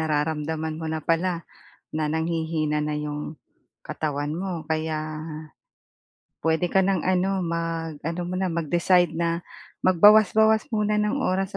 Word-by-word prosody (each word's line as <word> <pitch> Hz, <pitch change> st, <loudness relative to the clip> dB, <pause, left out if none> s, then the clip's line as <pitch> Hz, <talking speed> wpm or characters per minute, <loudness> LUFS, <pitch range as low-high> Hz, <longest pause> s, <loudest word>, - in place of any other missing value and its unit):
nararamdaman 155 Hz, +1 st, -1 dB
mo 160 Hz, -, -3 dB
na 155 Hz, -1 st, -3 dB
pala, 170 Hz, +1 st, 0 dB, 0.5 s
na 155 Hz, -1 st, 0 dB
nanghihina 160 Hz, -2 st, -1 dB
na 150 Hz, -, -2 dB
'yong 150 Hz, 0 st, -5 dB, 0.4 s
katawan 145 Hz, -1 st, -3 dB
mo 180 Hz, -2 st, -3 dB
kaya 155 Hz, -1 st, -2 dB, 1.3 s
puwede 160 Hz, +2 st, +2 dB
ka 190 Hz, -, +4 dB
ng 190 Hz, -4 st, +1 dB
ano 185 Hz, +1 st, +1 dB
mag-ano 165 Hz, -1 st, -3 dB
mo 180 Hz, -, -4 dB
na 190 Hz, -, 0 dB
mag-decide 175 Hz, +2 st, +2 dB
na 170 Hz, +1 st, -1 dB, 0.4 s
magbawas-bawas 215 Hz, +4 st, +6 dB
muna 210 Hz, 0 st, +1 dB
ng 210 Hz, +7 st, 0 dB
oras 195 Hz, -5 st, -1 dB
165 Hz, 125 wpm, -25 LUFS, 155-185 Hz, 1.3 s, magbawas-bawas